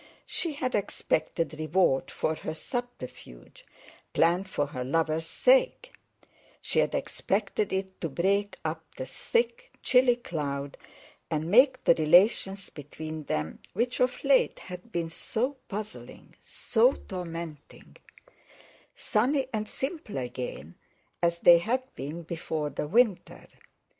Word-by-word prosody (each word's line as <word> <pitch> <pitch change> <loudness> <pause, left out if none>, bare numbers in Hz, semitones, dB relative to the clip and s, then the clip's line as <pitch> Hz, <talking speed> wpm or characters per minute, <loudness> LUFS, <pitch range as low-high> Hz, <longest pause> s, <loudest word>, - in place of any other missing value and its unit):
She 335 -3 -3
had 255 -3 -2
expected 160 -5 -1
reward 155 -3 +2
for 155 - -1
her 155 0 -5
subterfuge, 205 - -7 0.5
planned 175 +4 +2
for 145 - 0
her 135 -3 -5
lover's 160 +3 0
sake; - - +3 0.7
she - - -1
had - - +2
expected 205 +1 -1
it 190 0 -3
to 165 - -1
break 200 +7 0
up - - -2
the - - -5
thick, - - -1
chilly 250 -1 +5
cloud, 145 - -4 0.5
and 160 +1 -2
make 260 +5 +5
the - - +6
relations 190 +4 +3
between 155 +1 -7
them 75 - -2
which 240 +5 -1
of 250 0 +1
late 275 -1 +4
had 180 +5 -10
been 165 -3 -2
so 255 +10 -2
puzzling, 210 +1 -7
so 245 +4 +2
tormenting—sunny 175 - -5
and 215 -1 -2
simple 270 - -5
again 125 - -5 0.5
as 170 0 +2
they 170 0 +7
had 245 +9 0
been 150 +6 -6
before 160 -2 -3
the 145 - -3
winter. 220 +1 +1
180 Hz, 120 wpm, -28 LUFS, 155-240 Hz, 0.7 s, they